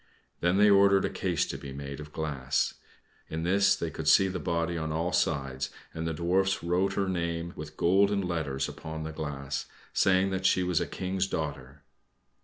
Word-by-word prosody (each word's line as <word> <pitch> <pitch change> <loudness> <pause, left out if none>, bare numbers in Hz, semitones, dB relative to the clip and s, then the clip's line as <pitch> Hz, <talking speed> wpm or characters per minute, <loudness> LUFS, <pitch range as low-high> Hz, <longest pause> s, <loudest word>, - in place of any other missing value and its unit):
Then 90 +2 +2
they 105 +1 +6
ordered 100 -1 +5
a - - -2
case 90 -5 0
to - - -5
be 70 - -8
made 70 0 -6
of 75 0 -9
glass. 70 -4 -1 0.6
In 80 +1 -3
this 100 +3 +4
they 85 - -3
could 80 0 -5
see 95 +5 +6
the 95 -1 -3
body 85 +1 -1
on 80 -1 -2
all 80 +3 -1
sides, 70 -3 0 0.2
and 80 0 -3
the 80 - -1
Dwarfs 95 +3 +1
wrote 90 +3 +1
her 100 -1 0
name 85 -2 -2
with 75 0 -8
golden 100 +3 +3
letters 80 -7 -2
upon 80 0 -6
the 80 - -4
glass, 70 -3 -4 0.3
saying 95 0 +3
that 95 0 +1
she 95 - +3
was 90 -2 +1
a - - -1
King's 95 +1 -2
daughter. 70 -4 -5
85 Hz, 190 wpm, -29 LUFS, 75-95 Hz, 0.6 s, they